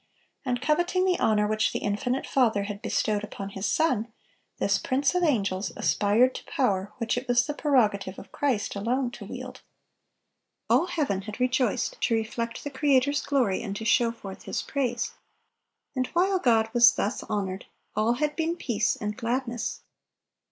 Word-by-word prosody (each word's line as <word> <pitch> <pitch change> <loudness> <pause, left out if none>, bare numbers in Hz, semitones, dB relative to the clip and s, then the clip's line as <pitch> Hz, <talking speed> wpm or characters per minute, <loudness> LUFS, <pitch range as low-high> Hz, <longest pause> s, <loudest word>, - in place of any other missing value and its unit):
And 250 -2 -2
coveting 350 +5 +2
the 365 -1 +2
honor 210 -1 +3
which 215 +1 +1
the - - 0
infinite 245 +6 -1
Father 225 -6 +2
had 205 0 -6
bestowed 210 -1 0
upon 200 -2 -6
His 195 0 -3
Son, 245 -7 +1 0.5
this - - +1
prince 270 +3 +1
of 360 - +1
angels 200 - +1
aspired 220 +5 +3
to - - -7
power 205 - 0
which 235 0 0
it 255 - -13
was 245 0 +3
the 295 - -3
prerogative 210 -10 +1
of - - -11
Christ 255 -10 -1
alone 240 +5 0
to - - -9
wield. - - -8 1.1
All 355 - +4
heaven 290 - -1
had 210 +3 -8
rejoiced 255 - 0
to 230 - +2
reflect 230 +1 -3
the 285 - -5
Creator's 285 0 +2
glory 250 -9 +1
and 200 -4 -4
to 220 - -5
show 235 0 +3
forth 195 -4 -10
His - - -2
praise. 245 -4 -1 0.8
And 255 -1 0
while 375 +2 +3
God 225 -6 +3
was 240 -1 +7
thus 205 - -1
honored, 195 -2 -3 0.3
all 215 +3 +2
had 295 +4 -1
been 330 +1 0
peace 225 -10 0
and 210 0 -4
gladness. 240 0 -2
240 Hz, 165 wpm, -27 LUFS, 210-275 Hz, 1.1 s, was